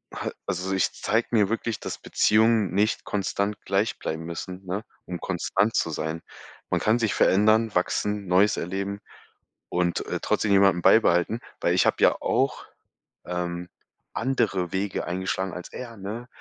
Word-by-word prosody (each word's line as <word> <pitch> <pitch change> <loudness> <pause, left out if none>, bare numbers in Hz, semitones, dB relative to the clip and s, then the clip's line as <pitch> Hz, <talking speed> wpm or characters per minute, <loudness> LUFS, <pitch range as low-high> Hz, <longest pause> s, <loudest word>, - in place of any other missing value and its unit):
ha - - -3
also, 90 +2 -2
ich 95 - +1
zeigt 115 +3 -1
mir 105 -3 +4
wirklich, 115 -1 -2
dass - - -5
Beziehungen 110 -4 +3
nicht 105 +3 +1
konstant 100 +1 -2
gleich 100 +3 0
bleiben 80 +1 -4
müssen, 90 +3 -7
ne, 100 +4 -3 0.2
um 90 -1 -5
konstant 100 +7 0
zu - - +1
sein. 80 +1 -3 0.5
Man - - +1
kann 110 +2 +3
sich 110 -3 0
verändern, 110 +2 +3
wachsen, 105 +3 0
Neues 95 +4 +4
erleben 100 +3 -3 0.7
und, 90 -1 0
äh, - - -2
trotzdem 105 - 0
jemanden 95 -3 +5
beibehalten, 95 +2 +4 0.2
weil - - +2
ich - - +3
habe - - +2
ja - - +4
auch, - - 0 0.6
ähm, 90 0 -4 0.4
andere 95 -9 0
Wege 95 0 -2
eingeschlagen 95 +1 -2
als 90 - -7
er, 115 -3 -8
ne? 105 +5 -6
100 Hz, 155 wpm, -25 LUFS, 90-110 Hz, 0.7 s, jemanden